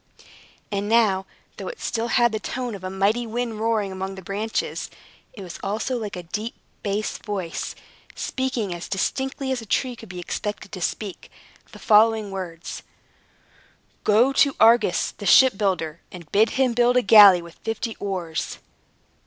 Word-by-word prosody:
And 205 0 -2
now, 205 -5 +3 0.3
though - - -6
it 485 - -7
still 230 0 -2
had 240 -1 +3
the 220 - -2
tone 245 0 -4
of 195 -2 -8
a 185 - -3
mighty 205 +5 +1
wind 230 -1 -3
roaring 220 -3 0
among 190 +1 -5
the 190 - -10
branches, 210 +5 -3 0.4
it 200 - -9
was 175 -2 -9
also 215 +6 -2
like 215 -4 -4
a 180 - -6
deep 215 +7 -5 0.3
bass 205 0 -2
voice, 190 -6 -4 0.4
speaking 255 -7 -2
as 175 0 -7
distinctly 265 +7 -2
as 255 -2 -1
a - - -10
tree 250 +3 0
could 225 -3 -13
be 180 - -8
expected 205 +3 -5
to 185 - -7
speak, 195 +2 -4 0.4
the - - -12
following 220 -1 +4
words: 175 -4 -6 1.2
"Go 230 +6 +4
to 280 0 +3
Argus, 230 +2 +4
the - - -7
shipbuilder, 195 - +4
and 170 -4 -11
bid 215 +3 +4
him 260 -2 +3
build 245 +1 +3
a 250 - +3
galley 200 -4 +8
with 170 0 -14
fifty 225 0 -3
oars." 180 -5 -3
210 Hz, 160 wpm, -23 LUFS, 190-235 Hz, 1.2 s, galley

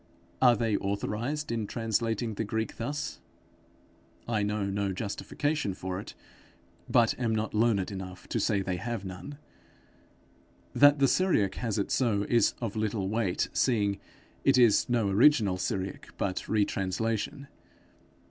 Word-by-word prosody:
Are 125 -2 +6
they 110 -1 0
authorized 115 +9 -2
in 115 -3 -2
translating 115 0 -1
the 110 - -2
Greek 110 +1 -3
thus? 145 +6 -4 1.1
I 110 -3 0
know 105 0 -1
no 100 0 -1
justification 110 +4 -2
for 95 0 -4
it, 100 - -9 0.7
but 120 -3 +4
am 115 -3 0
not 110 0 -2
learned 105 -3 +2
enough 95 -2 -8
to - - -1
say 100 -2 +1
they 95 -1 -2
have 115 +1 -4
none. 95 +9 -8 1.4
That 145 +1 +6
the 140 -1 +4
Syriac 120 - +2
has 115 -4 -1
it 100 - -1
so, 105 -6 +1
is 115 -3 +3
of 115 -4 -4
little 105 -3 -1
weight; 105 -4 0
seeing 100 -5 +1 0.4
it 135 -1 +4
is 120 -3 +5
no 120 -4 +2
original 105 -2 +4
Syriac, 95 0 -3
but 95 -2 -2
retranslation. 110 +6 -1
110 Hz, 140 wpm, -29 LUFS, 100-120 Hz, 1.4 s, Are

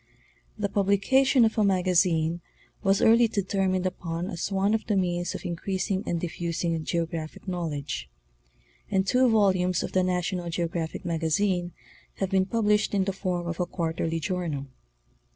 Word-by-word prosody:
The 210 -1 0
publication 210 +7 +3
of 220 0 0
a - - +4
magazine 175 -3 +2 0.4
was 195 -1 +2
early 230 +1 +6
determined 190 -3 0
upon 175 0 -3
as 175 +2 -3
one 195 +2 +2
of 220 - -1
the 210 - +1
means 175 -2 0
of - - -7
increasing 190 +2 -2
and 170 - 0
diffusing 170 -1 -2
geographic 165 0 -3
knowl 175 -3 -2
edge; 140 - -5 0.8
and 190 -1 +1
two 255 +4 +4
volumes 185 -5 +2
of - - -4
7Vhe 185 -1 +2
National 180 -1 -1
Geographic 170 0 -3
Magazine 175 +2 0 0.4
have 195 -1 -2
been 190 -1 +2
published 210 -1 +1
in 195 - +3
the 195 0 -2
form 180 -2 -2
of 170 0 -4
a 180 - 0
quarterly 165 -1 -2
journal. 160 -5 -2
180 Hz, 150 wpm, -27 LUFS, 170-200 Hz, 0.8 s, early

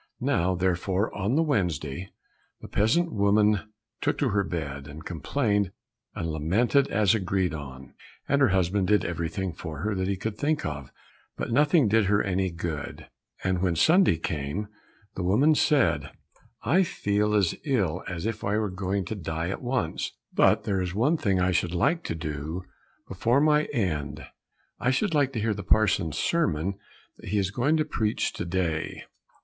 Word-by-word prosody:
Now 90 +2 +1
therefore 95 +3 0
on 105 +5 0
the 160 - +3
Wednesday, 90 - -1 0.5
the - - -10
peasant 165 +12 +1
woman 105 +1 +2 0.3
took 145 - 0
to 140 - +1
her 100 -1 +1
bed, 70 -6 -5
and 75 +2 -10
complained 100 - 0 0.4
and 85 - -3
lamented 110 - +2
as 105 -2 +3
agreed 95 -4 0
on, 65 -3 -8 0.3
and 140 0 +2
her 135 - +6
husband 95 0 +1
did 105 -3 +3
everything 85 +2 -3
for 80 -3 -7
her 105 +2 -1
that 95 -1 -1
he 100 -1 -1
could 105 +2 -4
think 155 +1 0
of, 75 -3 -5 0.5
but - - -3
nothing 145 +1 +4
did 110 +1 +3
her 100 +1 +3
any 95 0 0
good, 85 -3 -6 0.3
and 95 -1 0
when 90 -3 +1
Sunday 165 - +4
came 80 +6 -3 0.4
the - - -5
woman 110 - +4
said, 115 - +2 0.5
"I 180 +6 +4
feel 105 - 0
as 95 -5 +3
ill 95 - 0
as 90 0 -4
if 110 -1 -3
I 100 +1 +1
were 105 -3 -1
going 95 +1 -2
to 110 - -4
die 80 -2 -3
at 95 - -4
once, 120 -10 -2 0.2
but - - +4
there 95 -2 0
is 90 0 -3
one 135 +10 +3
thing 95 -9 +1
I 90 +1 +2
should 90 0 0
like 165 - +1
to - - -2
do 80 +2 -4 0.4
before 120 +4 +1
my 150 0 +4
end 75 - -2 0.5
I 125 - +1
should 165 +8 +1
like 145 -3 +2
to 115 - -2
hear 110 0 +1
the 100 - -5
parson's 95 -6 +2
sermon 100 - 0 0.4
that - - -10
he 105 - 0
is 95 -1 0
going 135 +9 +2
to 155 - +1
preach 110 -7 -1
to - - -4
day." 85 -3 -2
95 Hz, 175 wpm, -27 LUFS, 85-115 Hz, 0.5 s, her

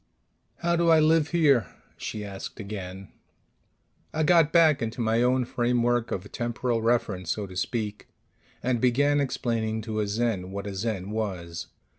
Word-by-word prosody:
"How 170 0 +2
do 170 0 +2
I 160 -1 +7
live 155 0 +4
here?" 145 - +3 0.3
she 105 -1 -5
asked 100 +2 -8
again. 95 -2 -7 1.0
I 155 - 0
got 165 -1 +5
back 160 -4 +5
into 115 +2 -3
my 115 0 +2
own 125 +1 +2
framework 120 0 +1
of 100 +2 -5
temporal 120 0 -1
reference, 110 -6 0
so 105 +3 -1
to 95 -1 -11
speak, 105 +1 -3 0.6
and 125 -2 0
began 145 +4 +3
explaining 110 -4 -1
to 110 -1 -3
a 105 - 0
Zen 105 -3 -1
what 100 +1 -5
a 100 - -4
Zen 100 -1 -3
was. 90 -6 -4
115 Hz, 155 wpm, -27 LUFS, 100-130 Hz, 1.0 s, I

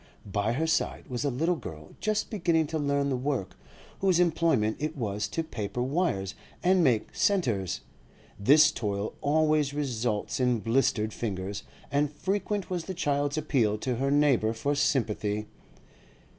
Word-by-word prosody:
By 100 +3 0
her 155 +6 0
side 160 - 0
was 125 0 -2
a 145 - +1
little 160 +8 +1
girl 75 - -9
just 215 +2 -1
beginning 170 -6 +2
to 160 - +1
learn 140 -1 +1
the - - +1
work, 130 -5 -2 0.4
whose 185 -3 +3
employment 160 -11 +2
it 155 +1 -3
was 105 -4 -2
to 165 +10 -2
paper 120 -5 -3
wires 130 - 0 0.3
and 185 0 +4
make 120 -7 +2
'centres.' 115 - +1 0.6
This 150 +9 +6
toil 105 -5 -3
always 150 -1 +2
results 120 -7 -1
in 125 -2 +2
blistered 115 -1 +1
fingers, 100 -2 -4 0.3
and 145 +1 +1
frequent 195 +4 -2
was 175 -3 -3
the 190 - -5
child's 145 -3 0
appeal 125 -9 +1
to 125 +2 -2
her 135 +2 0
neighbour 140 -6 +3
for 140 +6 -1
sympathy. 105 -7 0
140 Hz, 150 wpm, -28 LUFS, 110-160 Hz, 0.6 s, This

